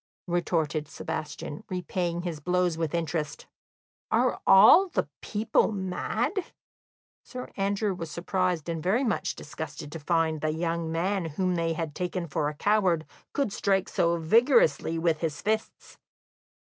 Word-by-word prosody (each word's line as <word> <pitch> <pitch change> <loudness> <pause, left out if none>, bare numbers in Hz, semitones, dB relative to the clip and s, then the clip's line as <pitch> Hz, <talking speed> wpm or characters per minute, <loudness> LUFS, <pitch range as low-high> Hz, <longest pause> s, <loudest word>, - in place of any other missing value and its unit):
retorted 165 -4 0
Sebastian, 150 -1 -5
repaying 175 -1 -2
his 170 -4 -4
blows 180 +2 +1
with 165 0 -2
interest. 160 -3 -2 0.6
"Are - - +1
all 220 - +8
the - - -1
people 215 +1 +1
mad?" 215 - -2 0.8
Sir 250 -1 -8
Andrew 200 +1 0
was 165 -3 -6
surprised 180 0 -1
and 165 -2 -3
very 200 - +2
much 230 - -1
disgusted 150 0 -7
to 165 - -6
find 160 0 0
that 155 0 0
the - - -5
young 165 -1 -1
man 180 +3 0
whom 180 +4 -1
they 165 -1 0
had 160 -2 -4
taken 180 +1 -3
for 150 -2 -1
a 150 - -8
coward 185 -3 +2 0.3
could 275 -8 -1
strike 195 -3 +1
so 170 0 +1
vigorously 165 - +3
with 165 -1 +1
his 155 -3 -2
fists. 220 +1 -3
170 Hz, 145 wpm, -27 LUFS, 160-195 Hz, 0.8 s, all